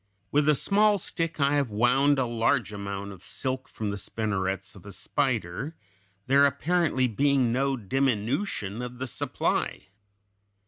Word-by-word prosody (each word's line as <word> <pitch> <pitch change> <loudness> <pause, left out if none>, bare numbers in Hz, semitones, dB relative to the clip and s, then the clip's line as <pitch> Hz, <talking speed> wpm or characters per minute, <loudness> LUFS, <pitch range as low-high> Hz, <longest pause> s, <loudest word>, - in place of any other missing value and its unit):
With 150 +1 +3
a 150 - +5
small 205 +5 +4
stick 165 -3 -3
I 140 0 +3
have 140 -4 +1
wound 125 +7 +3
a 130 - +2
large 115 0 +1
amount 100 0 -5
of 95 -3 -12
silk 130 0 -3
from 105 -2 -3
the 100 - -4
spinnerets 95 -3 -2
of 95 - -13
a - - -7
spider, 95 - -2 0.5
there 140 +1 +5
apparently 145 -2 +1
being 135 +1 +2
no 135 +2 +1
diminution 120 - -1
of 125 0 -6
the 130 - -3
supply. 120 - -2
130 Hz, 145 wpm, -27 LUFS, 105-140 Hz, 0.5 s, a